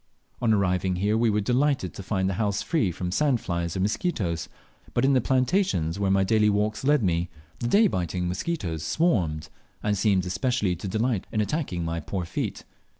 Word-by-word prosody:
On 115 -2 +3
arriving 95 -3 +1
here 100 +4 +1
we 115 0 +3
were 105 0 +1
delighted 125 -2 +1
to - - -7
find 95 -1 -1
the 95 - 0
house 100 -2 0
free 150 - +1
from 90 +1 -4
sand 135 +3 +2
flies 85 -2 -3
or - - -1
mosquitoes, 100 - -1 0.5
but - - +3
in 140 - +4
the 130 - +4
plantations 125 - +1
where 100 -1 +1
my 95 0 +3
daily 105 +2 +3
walks 105 +2 0
led 145 -2 +3
me, 85 -1 0 0.3
the 120 - -2
day 210 - +5
biting 90 - -1
mosquitoes 90 - -3
swarmed, 85 - 0 0.3
and 105 -1 +1
seemed 95 -2 +2
especially 105 0 0
to 90 +4 -6
delight 110 +1 -1
in 110 - -1
attaching 105 - -1
my 85 0 -2
poor 90 +3 -4
feet. - - -4
100 Hz, 190 wpm, -26 LUFS, 90-125 Hz, 0.5 s, day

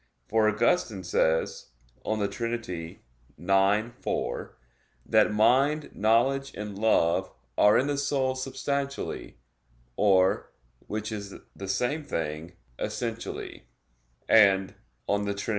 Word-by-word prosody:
For 110 -1 +3
Augustine 110 - +1
says 80 -1 0 0.4
(De 110 -2 0
Trin. 115 +3 -3
ix, 95 - -2
4), - - -3 0.5
that 110 -1 +4
"mind, 135 +8 +3
knowledge, 130 +6 +1
and 105 -1 -6
love 105 -6 +2 0.2
are 105 +8 +5
in 130 - +2
the 145 -1 -1
soul 140 -2 0
substantially, 140 +1 -4 0.6
or, 95 0 +3 0.4
which 110 +1 -4
is 100 -2 -6 0.2
the 95 - -7
same 125 +11 -1
thing, 80 - -4 0.3
essentially": - - -5 0.6
and 95 -3 +5 0.3
(De 100 0 0
Trin. 100 - -6
105 Hz, 105 wpm, -27 LUFS, 95-130 Hz, 0.6 s, are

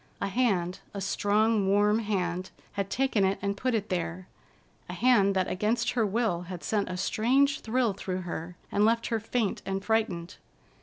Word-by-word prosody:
A 200 - -1
hand, 190 -6 0 0.2
a - - -3
strong, 205 +2 +2
warm 205 +2 +3
hand, 185 -4 -2 0.2
had 200 -1 -3
taken 260 -5 +1
it 190 +1 +2
and 200 0 -1
put 250 +4 0
it 215 -1 -2
there, 180 0 -3 0.6
a - - -4
hand 205 -6 +4
that 185 -1 +1
against 215 +5 0
her 225 -4 +1
will 210 -4 0
had 180 -2 -6
sent 205 -3 0
a 180 - -4
strange 265 +9 +2
thrill 235 -1 0
through 185 -1 -4
her, 175 0 -6 0.2
and 205 - +2
left 230 +2 +3
her 225 -2 0
faint 225 -1 -1
and 195 0 -3
frightened. 205 -5 -1
205 Hz, 175 wpm, -28 LUFS, 185-225 Hz, 0.6 s, hand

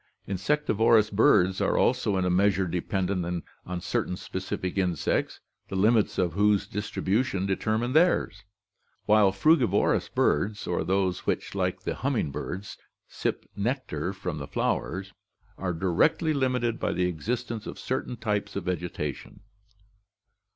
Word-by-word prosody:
Insectivorous 110 0 +2
birds 95 -2 +4
are - - +2
also 115 -6 +2
in 95 - +1
a - - +2
measure 95 +1 +3
dependent 90 -1 -2 0.2
on 90 -1 -3
certain 90 - -2
specific 95 0 -4
insects, 90 -6 0 0.3
the - - -6
limits 105 +3 +3
of 90 -4 +1
whose 105 +1 +3
distribution 105 0 -1
determine 110 +5 0
theirs, 170 - +2 0.6
while 105 -2 +5
frugivorous 125 - +3
birds, 100 +8 +1
or 90 - -1
those 95 -1 0
which, - - -1
like - - -1
the - - -2
humming 70 - -1
birds, 90 +8 -6 0.3
sip - - -3
nectar 100 - -2
from 90 -5 -5
the 70 - -6
flowers, 95 +2 -2 0.4
are 90 -1 -2
directly 95 - +2
limited 125 -4 0
by - - 0
the 90 +1 0
existence 115 +6 -3
of - - -7
certain 130 -1 -3
types 105 -2 -2
of 100 - -2
vegetation. 90 -5 -4
100 Hz, 130 wpm, -27 LUFS, 90-110 Hz, 0.6 s, while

